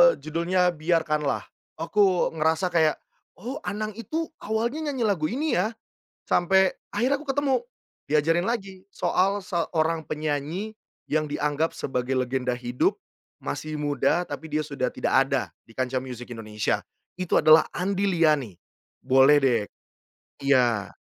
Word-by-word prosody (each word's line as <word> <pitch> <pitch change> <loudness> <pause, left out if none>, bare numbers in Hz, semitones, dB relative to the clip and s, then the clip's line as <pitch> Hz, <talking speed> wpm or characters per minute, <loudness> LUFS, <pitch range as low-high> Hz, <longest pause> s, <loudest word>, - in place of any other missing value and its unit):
judulnya 170 +5 +1
"Biarkanlah," 155 -3 0 0.3
aku 185 +3 +2
ngerasa 160 +4 +1
kayak, 160 -3 +3 0.4
"Oh, 245 +9 -6
Anang 215 +1 -2
itu 315 +7 -3
awalnya 235 +8 -2
nyanyi 265 -4 -2
lagu 190 -8 +1
ini 285 - 0
ya?" 225 +1 -1 0.5
Sampai 190 +2 +3 0.2
akhirnya 260 +4 +2
aku 300 +2 -12
ketemu 280 -1 +1 0.5
diajarin 160 +4 +2
lagi 195 -5 -3
soal 195 +2 +1
seorang 165 -3 -1
penyanyi 155 +8 -3 0.3
yang 155 0 +1
dianggap 150 +2 -1
sebagai 125 -1 -2
legenda 125 0 0
hidup, 125 0 -1 0.4
masih 155 - -4
muda 145 +4 +1
tapi 160 - -6
dia 155 - +1
sudah 140 -4 -2
tidak - - 0
ada 135 -3 0 0.2
di 115 - -17
kancah 130 +1 -1
musik 125 -2 -7
Indonesia 110 -2 -2 0.4
itu 185 -1 -1
adalah 155 +1 +7
Andy 195 +2 0
Liany, 155 - +2 0.5
boleh 135 +3 +6
deh 125 -5 +3 0.8
iya, 120 -7 +3
160 Hz, 130 wpm, -25 LUFS, 140-195 Hz, 0.8 s, adalah